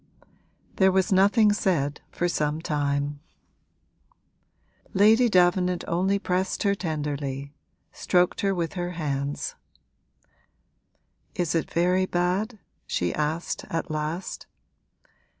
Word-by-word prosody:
There 190 Hz, -1 st, +5 dB
was 190 Hz, +2 st, +1 dB
nothing 205 Hz, +3 st, +5 dB
said 150 Hz, -8 st, 0 dB
for 175 Hz, -, -1 dB
some 150 Hz, -2 st, -1 dB
time: 145 Hz, -2 st, -1 dB, 1.8 s
Lady 220 Hz, +5 st, +5 dB
Davenant 180 Hz, -1 st, +3 dB
only 190 Hz, +4 st, +1 dB
pressed 185 Hz, 0 st, -1 dB
her 200 Hz, -1 st, +3 dB
tenderly 145 Hz, -5 st, -4 dB, 0.4 s
stroked 180 Hz, 0 st, +1 dB
her 195 Hz, -1 st, +1 dB
with 170 Hz, -2 st, -2 dB
her 175 Hz, -1 st, -3 dB
hands. 140 Hz, -2 st, -2 dB, 1.8 s
'Is 175 Hz, -2 st, 0 dB
it 165 Hz, -, 0 dB
very 180 Hz, +2 st, +2 dB
bad?' 185 Hz, +7 st, -1 dB, 0.3 s
she 90 Hz, -1 st, -1 dB
asked 155 Hz, +3 st, -2 dB
at 165 Hz, 0 st, -3 dB
last. 155 Hz, +4 st, -4 dB
175 Hz, 100 wpm, -26 LUFS, 150-190 Hz, 1.8 s, There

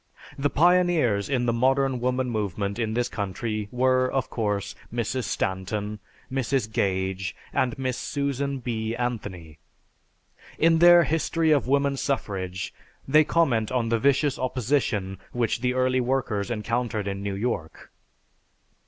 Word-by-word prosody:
The 145 Hz, +1 st, 0 dB
pioneers 165 Hz, -, +3 dB
in 125 Hz, -3 st, +1 dB
the 120 Hz, -, +1 dB
Modern 135 Hz, +2 st, +2 dB
Woman 125 Hz, +1 st, 0 dB
Movement 105 Hz, -2 st, -2 dB
in 110 Hz, -1 st, -1 dB
this 120 Hz, 0 st, +1 dB
country 105 Hz, +2 st, -3 dB
were, 130 Hz, +1 st, +2 dB
of 135 Hz, -1 st, -1 dB
course, 105 Hz, -3 st, -1 dB, 0.2 s
Mrs. 120 Hz, +1 st, -2 dB
Stanton, 100 Hz, +3 st, -2 dB, 0.3 s
Mrs. 130 Hz, -3 st, -1 dB
Gage, 95 Hz, -2 st, -1 dB, 0.2 s
and 130 Hz, +2 st, 0 dB
Miss 130 Hz, -1 st, -2 dB
Susan 140 Hz, -1 st, -2 dB
B. 115 Hz, -2 st, -3 dB
Anthony. 100 Hz, -11 st, -4 dB, 1.0 s
In 165 Hz, 0 st, +4 dB
their 175 Hz, 0 st, +8 dB
"History 160 Hz, +1 st, +1 dB
of 145 Hz, -5 st, +3 dB
Woman 140 Hz, 0 st, +2 dB
Suffrage" 95 Hz, -, -3 dB, 0.3 s
they 155 Hz, +3 st, +6 dB
comment 130 Hz, -10 st, +1 dB
on 120 Hz, -3 st, 0 dB
the 115 Hz, 0 st, +2 dB
vicious 140 Hz, +2 st, +2 dB
opposition 120 Hz, -7 st, -1 dB
which 120 Hz, -1 st, 0 dB
the 125 Hz, 0 st, 0 dB
early 130 Hz, 0 st, +2 dB
workers 120 Hz, -5 st, -1 dB
encountered 115 Hz, -1 st, -2 dB
in 100 Hz, 0 st, -3 dB
New 100 Hz, -1 st, -3 dB
York. 100 Hz, -6 st, -4 dB
120 Hz, 135 wpm, -25 LUFS, 105-135 Hz, 1.0 s, their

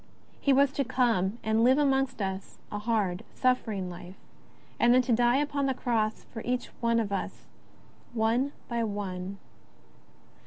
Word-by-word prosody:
He 280 Hz, -, +2 dB
was 275 Hz, 0 st, +5 dB
to 275 Hz, -, 0 dB
come 235 Hz, -6 st, +1 dB
and 220 Hz, +1 st, +2 dB
live 260 Hz, +3 st, +5 dB
amongst 270 Hz, -5 st, +1 dB
us 190 Hz, 0 st, -5 dB
a 210 Hz, -, -3 dB
hard, 210 Hz, -3 st, 0 dB
suffering 225 Hz, -7 st, 0 dB
Life, 180 Hz, +1 st, -9 dB, 0.6 s
and 240 Hz, +1 st, +5 dB
then 255 Hz, -, +5 dB
to 250 Hz, -, -1 dB
die 240 Hz, +2 st, +4 dB
upon 285 Hz, -1 st, 0 dB
the 265 Hz, -, 0 dB
Cross 225 Hz, -3 st, -1 dB
for 225 Hz, -, -5 dB
each 250 Hz, 0 st, -2 dB
of 230 Hz, -3 st, +1 dB
us 195 Hz, -, -4 dB, 0.7 s
one 235 Hz, +5 st, +1 dB, 0.2 s
by 235 Hz, -1 st, -1 dB
one. 200 Hz, -3 st, -4 dB
230 Hz, 150 wpm, -29 LUFS, 205-255 Hz, 0.7 s, was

